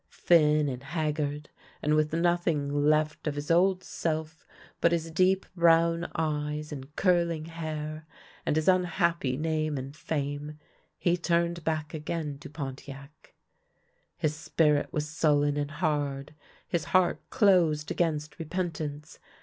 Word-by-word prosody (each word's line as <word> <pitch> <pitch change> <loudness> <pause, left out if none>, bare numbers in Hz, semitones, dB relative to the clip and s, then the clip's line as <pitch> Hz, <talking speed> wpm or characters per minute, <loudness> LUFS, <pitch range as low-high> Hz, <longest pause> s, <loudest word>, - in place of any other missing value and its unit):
Thin 150 -3 +3
and 130 -2 -4
haggard, 150 -1 -2 0.3
and 150 - +1
with 155 0 +2
nothing 160 -4 +1
left 155 0 +1
of 145 - -1
his 145 +2 -3
old 185 +2 +3
self 160 -1 -4 0.3
but 170 - +4
his 165 -1 -1
deep 185 +3 +3
brown 170 0 +3
eyes 150 -1 -2
and 140 +1 -8
curling 170 -4 +2
hair, 155 -1 -5 0.4
and - - 0
his 155 0 0
unhappy 170 -7 +2
name 155 -1 -1
and 135 +2 -6
fame, 150 -2 -4 0.4
he 175 0 +1
turned 170 0 0
back 155 0 -2
again 155 -2 -4
to 150 0 -10
Pontiac. 140 0 -9 0.8
His 155 -1 0
spirit 150 -1 +1
was 150 0 -2
sullen 145 -2 +2
and 145 -1 -1
hard, 145 -3 -2 0.3
his 165 -3 -1
heart 185 -2 +2
closed 175 -9 +3
against 155 -1 -1
repentance. 160 -3 -4
155 Hz, 130 wpm, -28 LUFS, 150-170 Hz, 0.8 s, but